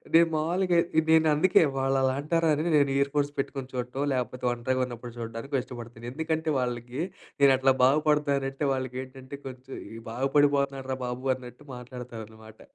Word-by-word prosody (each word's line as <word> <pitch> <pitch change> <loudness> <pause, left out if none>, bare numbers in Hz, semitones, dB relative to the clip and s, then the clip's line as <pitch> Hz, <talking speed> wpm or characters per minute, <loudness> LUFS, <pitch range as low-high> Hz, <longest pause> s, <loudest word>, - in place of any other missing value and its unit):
నేను 165 0 +7
మావులుగా 175 +3 +2 0.2
ఎ - - +2
నేను 160 -1 +5
అందుకే 175 +1 +5
వాళ్ళు 135 0 +1
అలా 130 0 +2
అంటారా 165 +1 +1
అనే 155 +3 -2
నేను 140 -1 +3
ఇయర్ 140 0 +1
ఫోన్స్ 145 -1 +1
పెట్టుకొని 135 -1 -3
చూడటం, 125 +3 -3
లేకపోతే 125 0 -3
ఒంటరిగా 130 +2 0
ఉన్నప్పుడు 120 -1 -8
చూడడానికో 115 +5 -5
ఇష్టపడతాను. 120 -2 -10
ఎందుకంటే 160 +1 -1
వాళ్ళకి 125 +2 -3 0.4
నేను 140 -1 +7
అట్లా 135 0 +4
బాగుపడతానంటే 140 -1 +2
వాళ్ళకి 130 -1 -3
ఏంటంటే 130 +1 -10
కొంచెం 130 +1 -8 0.3
బాగుపడిపోతున్నాడురా 135 +1 +1
బాబు 130 +2 -1
అన్నట్టు 125 +3 -12
మాట్లాడతారనమాట. 115 -3 -10
135 Hz, 145 wpm, -27 LUFS, 125-145 Hz, 0.4 s, నేను